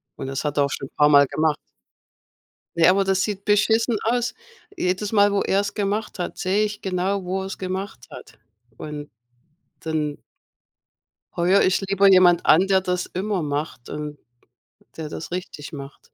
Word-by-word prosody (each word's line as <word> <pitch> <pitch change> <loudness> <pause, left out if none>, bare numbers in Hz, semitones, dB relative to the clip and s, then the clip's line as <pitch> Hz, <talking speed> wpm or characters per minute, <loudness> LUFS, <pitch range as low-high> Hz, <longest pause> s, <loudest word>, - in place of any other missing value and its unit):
Und 135 - -6
das 135 +2 -4
hat 145 - -1
er 145 - +4
auch 140 - -1
schon 135 - -4
paarmal 145 -2 +6
gemacht. 155 0 0 1.2
Ja, 170 +2 +6
aber 195 +1 +2
das 190 -1 +1
sieht 200 -2 -4
beschissen 220 +2 +2
aus. 240 +2 0 0.4
Jedes 185 +3 -1
Mal, 205 -1 +4
wo 200 - +1
er's 200 +1 0
gemacht 205 -1 -2
hat, 175 - -4
sehe 195 +3 +1
ich 210 0 -6
genau, 190 +1 -1
wo 190 +1 -2
er's 195 - -6
gemacht 185 -8 -5
hat. - - -12 0.4
Und 150 -1 -7 0.7
dann 155 -2 -3 1.1
heuere 180 +3 +3
ich 185 +1 +2
lieber 195 0 +3
jemand 180 -2 +5
an, 175 +5 +6
der 190 -1 +3
das 180 -1 -2
immer 190 -2 -2
macht 145 -4 -4
und, 150 -1 -6 0.8
der 155 -2 -5
das 165 - -7
richtig 180 -5 -6
macht. 140 -1 -9
185 Hz, 160 wpm, -23 LUFS, 150-200 Hz, 1.2 s, paarmal